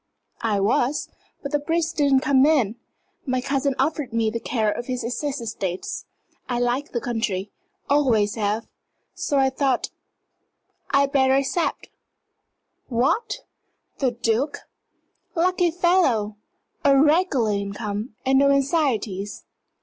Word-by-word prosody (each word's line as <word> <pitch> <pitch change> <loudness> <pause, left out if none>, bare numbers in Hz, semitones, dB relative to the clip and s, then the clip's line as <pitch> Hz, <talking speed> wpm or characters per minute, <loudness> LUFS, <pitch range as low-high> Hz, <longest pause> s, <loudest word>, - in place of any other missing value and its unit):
"I 215 -3 +1
was, 240 +8 +1 0.3
but 280 - -4
the 295 - +2
briefs 330 +3 -1
didn't 280 -4 +3
come 265 -1 +4
in. 275 -8 +3 0.5
My 255 0 +1
cousin 275 +1 0
offered 280 -1 -1
me 225 -1 +1
the 230 - -3
care 220 -3 0
of 240 - -5
his 250 -2 -3
Essex 270 +4 -2
estates. 220 - -4 0.4
I 245 - 0
like 245 +4 0
the 240 - -1
country 210 -5 -2 0.4
always 235 -8 +3
have. 215 0 -1 0.5
So 285 - -1
I 265 -1 +3
thought 265 -1 0 1.0
I'd 275 0 +3
better 265 -1 +4
accept." 275 +5 -1 1.0
"What 420 - 0 0.6
the 265 - +2
Duke? 240 +4 -1 0.7
Lucky 360 +1 +2
fellow! 320 - +2 0.5
A 275 -1 +5
regular 295 - +3
income, 205 +2 -3
and 265 0 +4
no 280 0 +5
anxieties. 270 - 0
265 Hz, 125 wpm, -23 LUFS, 225-285 Hz, 1.0 s, A